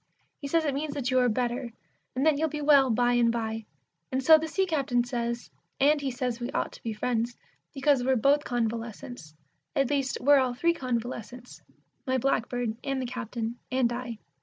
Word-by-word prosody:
He 280 Hz, -, -5 dB
says 325 Hz, +2 st, +2 dB
it 285 Hz, -, 0 dB
means 290 Hz, +1 st, -3 dB
that 265 Hz, -3 st, -2 dB
you 255 Hz, -, +4 dB
are 250 Hz, -1 st, +3 dB
better, 240 Hz, +1 st, -2 dB, 0.4 s
and 265 Hz, +3 st, 0 dB
that 315 Hz, -2 st, +5 dB
you'll 315 Hz, +2 st, 0 dB
be 300 Hz, -, -4 dB
well 285 Hz, -3 st, +5 dB
by 245 Hz, +1 st, +2 dB
and 240 Hz, -1 st, +4 dB
by. 225 Hz, -1 st, -3 dB, 0.5 s
And 260 Hz, 0 st, -1 dB
so 320 Hz, +4 st, +9 dB
the 320 Hz, -, -3 dB
Sea 385 Hz, +4 st, +1 dB
captain 275 Hz, -8 st, +1 dB
says, 235 Hz, -1 st, -3 dB, 0.3 s
and 290 Hz, +2 st, +4 dB
he 275 Hz, -, -1 dB
says 250 Hz, -1 st, -3 dB
we 240 Hz, +1 st, -3 dB
ought -, -, -1 dB
to -, -, -14 dB
be 230 Hz, -, -3 dB
friends, 235 Hz, +2 st, -1 dB, 0.3 s
because 270 Hz, -2 st, +2 dB
we're 260 Hz, +1 st, +3 dB
both 280 Hz, +5 st, +3 dB
convalescents 230 Hz, -7 st, -4 dB, 0.4 s
at 275 Hz, 0 st, +1 dB
least 275 Hz, -2 st, 0 dB
we're 285 Hz, +1 st, +6 dB
all 255 Hz, -2 st, 0 dB
three 335 Hz, +6 st, +2 dB
convalescents, 245 Hz, -2 st, -5 dB, 0.5 s
my 260 Hz, 0 st, +2 dB
blackbird, 245 Hz, -3 st, -1 dB
and 275 Hz, -1 st, -1 dB
the 260 Hz, -, -2 dB
Captain 240 Hz, -1 st, -4 dB
and 255 Hz, -2 st, +2 dB
I. 240 Hz, -2 st, -5 dB
250 Hz, 195 wpm, -28 LUFS, 235-275 Hz, 0.5 s, so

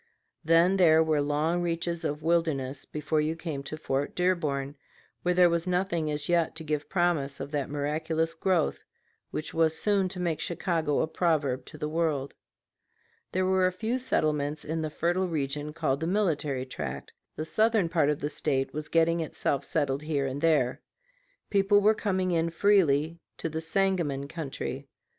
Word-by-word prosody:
Then 165 Hz, +4 st, +4 dB
there 160 Hz, -3 st, +6 dB
were 155 Hz, -2 st, +1 dB
long 150 Hz, +4 st, 0 dB
reaches 170 Hz, 0 st, -2 dB
of 150 Hz, -1 st, -3 dB
wilderness 155 Hz, -5 st, 0 dB
before 150 Hz, +1 st, -1 dB
you 155 Hz, +2 st, -1 dB
came 160 Hz, -4 st, -5 dB
to 145 Hz, +3 st, -6 dB
Fort 140 Hz, -2 st, -2 dB
Dearborn, 150 Hz, -6 st, 0 dB, 0.5 s
where 180 Hz, 0 st, +1 dB
there 180 Hz, 0 st, +7 dB
was 170 Hz, +1 st, 0 dB
nothing 180 Hz, -3 st, 0 dB
as 150 Hz, 0 st, -2 dB
yet 170 Hz, -2 st, +1 dB
to 160 Hz, -, -6 dB
give 150 Hz, -1 st, -3 dB
promise 170 Hz, -7 st, 0 dB
of 140 Hz, -, -6 dB
that 145 Hz, -3 st, -2 dB
miraculous 155 Hz, +3 st, -1 dB
growth 170 Hz, -1 st, 0 dB, 0.5 s
which 155 Hz, -, -5 dB
was 160 Hz, -1 st, +2 dB
soon 200 Hz, -3 st, +1 dB
to 180 Hz, -, -7 dB
make 170 Hz, -3 st, -1 dB
Chicago 165 Hz, -4 st, 0 dB
a -, -, 0 dB
proverb 145 Hz, -7 st, 0 dB
to 155 Hz, -, -11 dB
the 150 Hz, 0 st, -3 dB
world. 155 Hz, -4 st, -1 dB, 1.0 s
There 185 Hz, 0 st, +1 dB
were 185 Hz, 0 st, +3 dB
a -, -, 0 dB
few 225 Hz, +7 st, -2 dB
settlements 150 Hz, -, 0 dB
in 160 Hz, +1 st, -2 dB
the 155 Hz, -, -2 dB
fertile 175 Hz, +4 st, 0 dB
region 150 Hz, -2 st, -2 dB
called 150 Hz, -4 st, -1 dB
the 160 Hz, -, -2 dB
Military 155 Hz, -9 st, 0 dB
Tract; 70 Hz, -, -6 dB, 0.2 s
the 155 Hz, -, -4 dB
southern 215 Hz, +1 st, +2 dB
part 165 Hz, -3 st, +2 dB
of 150 Hz, -, -1 dB
the 145 Hz, -, -1 dB
State 135 Hz, -2 st, -1 dB
was 150 Hz, +1 st, -5 dB
getting 165 Hz, 0 st, +3 dB
itself 145 Hz, -3 st, -1 dB
settled 140 Hz, -4 st, 0 dB
here 150 Hz, -3 st, -1 dB
and 135 Hz, +1 st, -3 dB
there. 150 Hz, -6 st, +2 dB, 0.7 s
People 200 Hz, 0 st, +4 dB
were 210 Hz, +2 st, +5 dB
coming 190 Hz, -4 st, -1 dB
in 165 Hz, -1 st, +1 dB
freely 165 Hz, -4 st, +2 dB, 0.2 s
to 165 Hz, -, -3 dB
the 160 Hz, +1 st, -3 dB
Sangamon 165 Hz, -6 st, 0 dB
country. 140 Hz, -3 st, -5 dB
160 Hz, 170 wpm, -28 LUFS, 145-175 Hz, 1.0 s, there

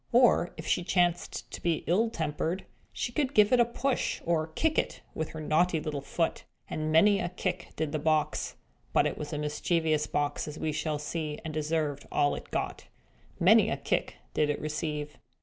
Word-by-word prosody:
Or, 240 Hz, -7 st, +5 dB
if 160 Hz, -, -7 dB
she 180 Hz, -, +1 dB
chanced 175 Hz, -1 st, 0 dB
to -, -, -7 dB
be 170 Hz, -3 st, 0 dB
ill 215 Hz, +7 st, +3 dB
tempered, 160 Hz, 0 st, -2 dB, 0.3 s
she 240 Hz, -, -3 dB
could 275 Hz, +1 st, -1 dB
give 210 Hz, +2 st, +6 dB
it 250 Hz, -, +6 dB
a 240 Hz, -, +6 dB
push, 250 Hz, +3 st, -1 dB
or 160 Hz, -2 st, +1 dB
kick 310 Hz, -, +1 dB
it -, -, -2 dB
with 160 Hz, -, -3 dB
her 160 Hz, -, -7 dB
naughty 160 Hz, +2 st, +2 dB
little 150 Hz, -2 st, -3 dB
foot. 165 Hz, +4 st, -1 dB, 0.2 s
And 155 Hz, 0 st, -2 dB
many 200 Hz, +6 st, +5 dB
a 175 Hz, -, -1 dB
kick 180 Hz, 0 st, -3 dB
did 155 Hz, -2 st, -2 dB
the 155 Hz, -, -1 dB
box 155 Hz, 0 st, 0 dB, 0.4 s
(but -, -, +4 dB
it -, -, 0 dB
was 150 Hz, -1 st, -5 dB
a 150 Hz, -, -2 dB
mischievous 155 Hz, +1 st, 0 dB
box, 145 Hz, +1 st, -1 dB
as 150 Hz, 0 st, -6 dB
we 155 Hz, -, -1 dB
shall 150 Hz, 0 st, -1 dB
see, 150 Hz, 0 st, -3 dB
and 155 Hz, -, -4 dB
deserved 155 Hz, -2 st, -1 dB
all 145 Hz, -1 st, +3 dB
it -, -, -7 dB
got) -, -, -3 dB, 0.5 s
many -, -, +6 dB
a -, -, -1 dB
kick -, -, -1 dB, 0.2 s
did 150 Hz, -1 st, +2 dB
it 150 Hz, -, 0 dB
receive. 150 Hz, -1 st, -3 dB
160 Hz, 195 wpm, -29 LUFS, 150-180 Hz, 0.5 s, give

